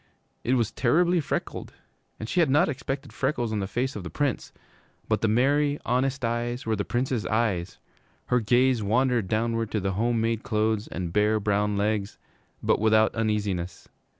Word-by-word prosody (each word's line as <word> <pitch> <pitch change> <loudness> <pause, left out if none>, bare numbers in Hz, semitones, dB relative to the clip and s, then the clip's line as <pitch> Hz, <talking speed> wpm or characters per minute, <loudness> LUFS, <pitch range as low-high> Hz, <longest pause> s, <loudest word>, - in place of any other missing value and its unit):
It 130 - +2
was 115 -4 +1
terribly 170 +7 +2
freckled, - - -4 0.5
and 110 - -5
she 180 - 0
had 165 -5 +4
not 150 +7 +4
expected 135 -1 -4
freckles 130 -4 -1
on 110 - -1
the 95 - -2
face 130 +6 -2
of 105 - -5
the 90 - -6
Prince. 140 - -2 0.6
But - - 0
the 110 - +2
merry, 145 +6 +2
honest 130 +1 0
eyes 120 +2 -2
were 110 -1 +1
the 100 - -2
Prince's 120 0 -1
eyes. 105 -6 -1 0.5
Her 125 - +2
gaze 120 +2 +3
wandered 120 +1 +1
downward 115 +1 0
to 110 - -1
the 95 0 -1
home 115 +4 0
made 115 0 0
clothes 110 +1 0
and 85 -2 -5
bare, 105 +1 +3
brown 105 0 0
legs, 105 0 -1 0.5
but - - +2
without 110 0 +4
uneasiness. 105 -5 -2
115 Hz, 175 wpm, -26 LUFS, 105-130 Hz, 0.6 s, had